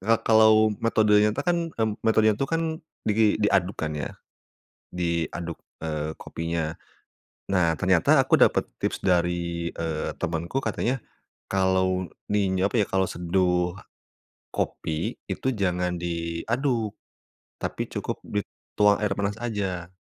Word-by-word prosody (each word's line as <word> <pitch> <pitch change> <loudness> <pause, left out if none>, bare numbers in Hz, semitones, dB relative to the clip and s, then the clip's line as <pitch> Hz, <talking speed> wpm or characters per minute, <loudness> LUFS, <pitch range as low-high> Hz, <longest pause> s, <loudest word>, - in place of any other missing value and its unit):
ka 110 +4 +3
kalau 110 -1 +6
metodenya 105 -2 +4
tuh 145 - -3
kan, 175 -1 +2 0.2
me 110 - +2 0.2
metodenya 110 -1 +4
itu 135 - 0
kan 165 0 0 0.4
di 105 0 +3
diaduk 95 -2 +2
kan, 80 -1 -2
ya. 75 - -3 0.8
Diaduk, 85 -1 -2 0.3
eee, 75 -1 -2
kopinya, 80 -1 -3 0.8
nah, 90 -4 +3
ternyata 95 -4 +4
aku - - +4
dapet - - +5 0.2
tips - - -1
dari, 85 -2 +1
eee, 80 -2 -3
temenku 85 +8 -2
katanya 130 +3 0 0.5
kalau 95 -1 +1 0.2
ni 100 -2 +2 0.2
apa 105 +2 +2
ya, - - +2
kalau 95 0 +2
seduh 90 0 0 0.8
kopi 80 0 -2
itu - - -2
jangan 90 -2 0
diaduk 100 - -1 0.7
tapi - - -2
cukup - - -4
dituang 105 0 +1
air 105 - +1
panas 100 0 -1
aja. 95 -6 -3
95 Hz, 125 wpm, -26 LUFS, 85-105 Hz, 0.8 s, kalau